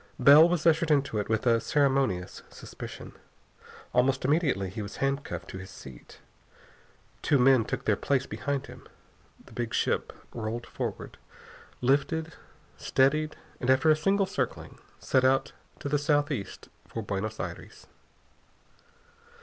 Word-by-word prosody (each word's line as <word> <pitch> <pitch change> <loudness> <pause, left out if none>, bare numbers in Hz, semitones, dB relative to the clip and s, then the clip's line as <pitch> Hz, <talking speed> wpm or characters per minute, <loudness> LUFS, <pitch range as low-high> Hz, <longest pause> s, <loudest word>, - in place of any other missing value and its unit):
Bell 150 +4 +8
was 170 -3 -1
ushered 165 0 +3
into 140 -7 +1
it 105 - -4
with 110 +1 0
a 115 -2 +3
ceremonious 135 -10 0
suspicion. - - -10 0.8
Almost 130 +2 +2
immediately 135 - +1
he 110 - -5
was 100 0 -7
handcuffed 140 +1 -3
to 95 - -7
his 95 +1 -9
seat. 65 -7 -13 1.0
Two 145 - +3
men 130 -3 +5
took - - -4
their 105 - +3
place 130 +4 0
behind 140 -1 -3
him. - - -13 0.6
The - - -17
big 120 -2 -3
ship - - 0 0.2
rolled 115 +1 -4
forward, - - -6 0.6
lifted, 155 +5 +1 0.4
steadied, 150 +4 +1 0.2
and 125 - -2
after 130 +4 +5
a - - +5
single 195 +5 +1
circling 190 - -4 0.2
set 130 - +1
out 135 +1 +2 0.3
to - - -4
the 145 +1 +1
southeast 145 - -1 0.2
for 115 - -5
Buenos 105 +2 -4
Aires. - - -7
135 Hz, 135 wpm, -28 LUFS, 110-150 Hz, 1.0 s, Bell